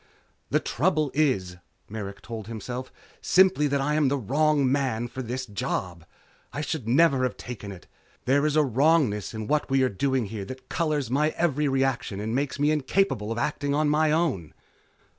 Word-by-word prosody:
The - - +2
trouble 155 -1 0
is, 100 -12 0 0.3
Merrick 100 -2 -7
told 110 -3 -7
himself, 120 +3 -6 0.3
_simply 185 -5 +4
that 140 0 0
I 150 +2 0
am 150 -2 +3
the 140 +2 +1
wrong 140 +2 +2
man 130 -4 0
for 130 +2 -6
this 130 +2 -4
job. 90 -5 -4 0.5
I 145 - -4
should 150 -5 -4
never 135 +2 +4
have 125 -1 -1
taken 105 -4 -7
it. 95 -3 -11 0.4
There's 145 +3 +2
a 155 - +5
wrongness 135 -4 +2
in 110 0 -4
what 150 +5 0
we 135 0 +3
are 130 - +2
doing 130 +4 0
here 100 -3 -4
that 130 +6 -10
colors 150 -6 -1
my 150 +3 +2
every 150 -3 +1
reaction 135 -6 0
and 110 +2 -3
makes 140 +2 -1
me 145 +1 +3
incapable 145 - 0
of 115 - -3
acting 145 +3 -1
on 150 0 +2
my 155 +1 +3
own. 150 - -1
135 Hz, 180 wpm, -26 LUFS, 115-150 Hz, 0.5 s, a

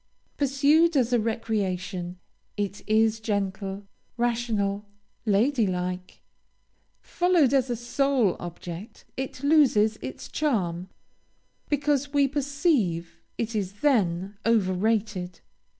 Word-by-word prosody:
Pursued 290 +4 +3
as 250 -2 +2
a 240 - +4
recreation, 195 -5 -2 0.4
it 205 0 -3
is 220 0 +3
gentle, 200 -2 -3 0.3
rational, 220 -4 0 0.4
lady 225 +3 +3
like. 180 0 -4 0.8
Followed 350 -7 +2
as 265 -2 +2
a 240 - 0
sole 245 -3 +1
object, 175 +3 -8
it 265 0 -5
loses 250 -8 +4
its 130 - -7
charm, 185 - -1 0.8
because 290 -1 0
we 285 -1 +4
perceive 275 - 0 0.2
it 230 0 -3
is 200 -1 -3
then 200 -8 +1
over 215 -5 +2
rated. 200 -3 -1
220 Hz, 105 wpm, -26 LUFS, 190-270 Hz, 0.8 s, a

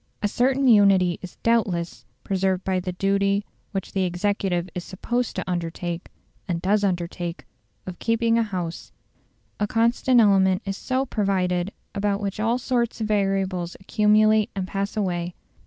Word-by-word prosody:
A - - +3
certain 260 +5 +2
unity 195 -6 +5
is 185 - -9
doubtless 195 -7 0 0.2
preserved 190 -1 0
by 190 -1 0
the 180 0 -4
duty 200 +2 +1 0.3
which 195 -2 -4
the 195 - -1
executive 180 -1 -1
is 180 - -4
supposed 240 +7 -2
to - - -4
undertake, 175 -1 -3 0.4
and 175 -3 -1
does 205 +4 +1
undertake, 175 -2 -2 0.4
of 180 -1 -7
keeping 230 0 +2
a 230 - +3
house; 180 -6 -4 0.7
a 205 - +1
constant 235 +3 +3
element 195 -2 +4
is 195 -1 -2
so 260 +5 -1
provided 190 -5 0 0.2
about 200 0 0
which 200 -1 -4
all 225 +3 +1
sorts 240 -2 -1
of 220 - -1
variables 195 -4 0
accumulate 215 +2 +3
and 190 -2 -2
pass 200 +2 -3
away. 175 -3 -1
195 Hz, 150 wpm, -24 LUFS, 180-215 Hz, 0.7 s, unity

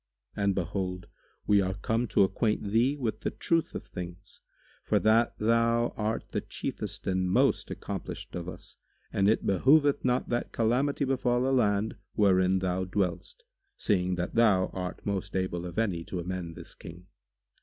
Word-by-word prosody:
[FN#143] 100 - -2
And 100 -1 +2
behold 90 0 -3 0.4
we 100 -1 +4
are 95 0 -1
come 115 +3 -1
to 100 - +4
acquaint 105 +1 0
thee 125 +6 +3
with 110 -5 -2
the - - -1
truth 165 -1 0
of - - -4
things, 90 +2 -9 0.4
for - - +2
that 115 +2 +3
thou 115 +1 +2
art 110 +1 -2
the - - -1
chiefest - - -5
and 95 -1 0
most - - +2
accomplished - - -6
of 90 0 -4
us - - -11 0.4
and 95 +1 +3
it 110 - +1
behoveth 140 - +4
not 125 0 +1
that 120 0 -1
calamity 130 +6 +1
befal 125 -1 +1
a 135 - +2
land 105 -3 +1 0.2
wherein 95 -2 +4
thou 95 0 -1
dwellest, 100 - -2 0.3
seeing 90 -3 +1
that 90 0 -3
thou 105 -5 +4
art 90 -1 -5
most 100 -2 -3
able 90 -2 -2
of 85 - -9
any 95 -7 0
to 95 - -5
amend 85 -1 -5
this - - -10
King. 85 +2 -11
100 Hz, 165 wpm, -29 LUFS, 90-115 Hz, 0.4 s, we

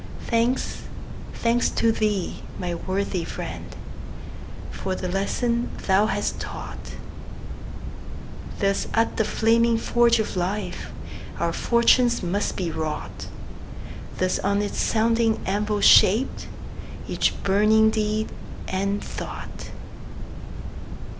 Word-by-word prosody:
Thanks, 235 +2 0 0.5
thanks 235 +1 +1
to 230 - +2
thee, 210 -4 -1 0.2
my 180 -1 -2
worthy 185 0 -2
friend, - - -6 1.0
For 190 - -3
the 185 - -3
lesson 235 +6 0 0.2
thou 195 +2 +4
hast - - -1
taught! - - -7 1.6
Thus 200 -1 +1
at 225 0 +2
the 220 - +3
flaming 230 +2 +3
forge 235 0 +3
of 220 -3 -2
life 185 +4 -2 0.5
Our - - 0
fortunes 235 -1 +3
must 195 +4 -1
be 175 -3 -1
wrought; 155 -1 -4 0.9
Thus 185 0 +1
on 200 +1 +1
its 205 - -3
sounding 225 0 +2
anvil 205 +1 0
shaped 215 +6 +5 0.6
Each - - +1
burning 215 +3 +4
deed 215 0 -1 0.4
and 200 +2 -1
thought. - - -7
210 Hz, 100 wpm, -24 LUFS, 195-230 Hz, 1.6 s, shaped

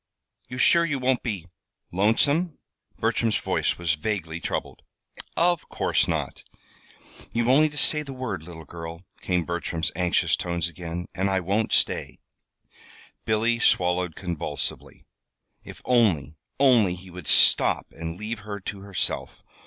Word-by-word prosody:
"You 125 - -7
sure 170 +6 +5
you 150 -4 0
won't 130 -1 +1
be 100 -8 -3 0.5
lonesome?" 140 - +2 0.4
Bertram's 115 0 +1
voice - - 0
was 85 -2 0
vaguely 85 -1 -3
troubled. - - -4 0.6
"Of 175 0 +2
course - - +1
not!" - - -3 0.9
"You've 115 0 0
only 150 +5 +5
to 150 - -10
say 150 +1 +5
the 140 -2 -8
word, 130 -10 -4
little 80 -1 -11
girl," 85 +2 -8 0.2
came 90 -2 0
Bertram's 85 -1 -2
anxious 90 0 +2
tones 85 -2 -2
again, 85 +1 -6
"and 95 +2 0
I 95 -1 +2
won't 100 +5 0
stay." - - +1 1.1
Billy 115 +2 +1
swallowed 90 -5 +2
convulsively. 90 -5 -4 0.6
If - - -12
only, 95 - +2 0.3
only 120 -10 +5
he 90 +1 -13
would 90 -3 -9
stop - - +5
and 80 +1 -6
leave 105 +2 -4
her 105 -1 -6
to 100 +1 -6
herself! 100 -1 -3
95 Hz, 135 wpm, -25 LUFS, 85-120 Hz, 1.1 s, sure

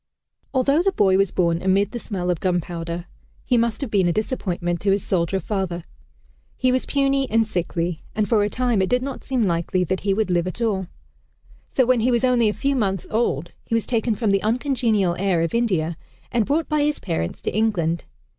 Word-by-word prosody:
Although 275 +4 +3
the 390 +2 +2
boy 195 - +3
was 195 0 +3
born 170 -2 +1
amid 195 +2 +2
the 240 - -4
smell 180 -5 -2
of 175 - -2
gunpowder, 175 -1 -2 0.4
he 250 - +2
must 235 +1 +1
have 265 -6 -4
been 190 -4 +3
a - - +3
disappointment 175 -5 -2
to 200 - +1
his 195 0 +2
soldier 185 +1 0
father. 185 -2 -3 0.7
He 255 - +2
was 255 0 0
puny 275 -1 +1
and 225 +1 +3
sickly, 175 -4 -2
and 215 -1 +1
for 215 -3 +3
a 205 - 0
time 240 -3 +1
it 190 - 0
did 250 0 +2
not 275 -1 -5
seem 255 -3 0
likely 175 0 +1
that 185 +2 -1
he 195 0 0
would 215 -3 0
live 175 0 +1
at 185 - -5
all. 200 -6 0 0.9
So 260 - +4
when 250 0 +3
he 235 +3 +2
was 240 -1 +2
only 245 -3 +4
a - - +1
few 275 +5 -1
months 195 -7 0
old, 175 - 0
he 230 - -2
was 230 - 0
taken 230 -2 0
from 215 -2 0
the 195 0 +2
uncongenial 225 -6 +1
air 185 -4 +2
of 165 - -2
India 180 -9 0 0.3
and 235 -4 +1
brought 310 +3 +1
by 305 -1 +1
his 295 0 +1
parents 80 +1 -3
to - - -2
England. 175 -7 0
205 Hz, 210 wpm, -22 LUFS, 180-240 Hz, 0.9 s, So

